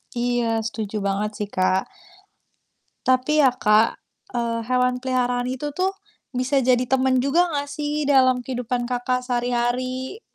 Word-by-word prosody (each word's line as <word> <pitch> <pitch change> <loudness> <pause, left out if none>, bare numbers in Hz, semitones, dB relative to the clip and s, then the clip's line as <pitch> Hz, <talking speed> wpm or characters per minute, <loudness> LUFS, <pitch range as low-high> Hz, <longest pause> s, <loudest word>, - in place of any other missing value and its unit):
Iya, 240 -2 0
setuju 215 -2 -4
banget 200 +2 -1
sih, 205 - -7
Kak. 185 +1 +1 1.2
Tapi 260 +4 +3
ya 265 - +6
Kak, 220 -2 +3 0.3
eee, 235 -1 -1
hewan 250 0 +2
peliharaan 250 -1 0
itu 260 +3 -4
tuh, 370 +1 +1 0.4
bisa 260 +2 +1
jadi 250 0 +3
teman 260 +1 +2
juga 280 +8 +2
enggak 285 -2 -2
sih, 300 0 -2
dalam 260 -3 +4
kehidupan 250 -1 -2
Kakak 250 0 -1
sehari-hari? 250 - -1
250 Hz, 135 wpm, -23 LUFS, 240-260 Hz, 1.2 s, ya